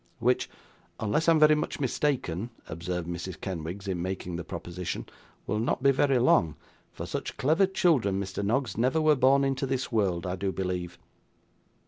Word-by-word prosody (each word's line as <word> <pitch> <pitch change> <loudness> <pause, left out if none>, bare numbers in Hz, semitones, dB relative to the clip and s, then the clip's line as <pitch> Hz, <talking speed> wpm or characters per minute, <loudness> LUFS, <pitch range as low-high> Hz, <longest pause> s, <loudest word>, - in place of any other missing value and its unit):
'Which, - - +1 0.5
unless 130 +10 +1
I - - +7
am 160 - +3
very 155 0 +7
much 150 - -2
mistaken,' 125 - -1 0.2
observed 90 +1 -4
Mrs. 85 +1 -5
Kenwigs 95 +2 -5
in 90 -3 -2
making 90 -1 -4
the 85 - -4
proposition, 90 +1 -5 0.4
'will 105 - -1
not 120 +3 -1
be 140 - +6
very 135 0 +3
long; 85 - +3 0.4
for - - -6
such - - -5
clever 160 +8 +3
children, 135 - +2
Mr 100 +1 -4
Noggs, 115 0 0
never 130 +7 +2
were 155 -1 +4
born 135 +1 +4
into 135 0 0
this 130 -1 -2
world, 95 -6 +1
I 90 0 -2
do 95 0 -1
believe. 90 -2 -3
105 Hz, 170 wpm, -28 LUFS, 90-135 Hz, 0.5 s, I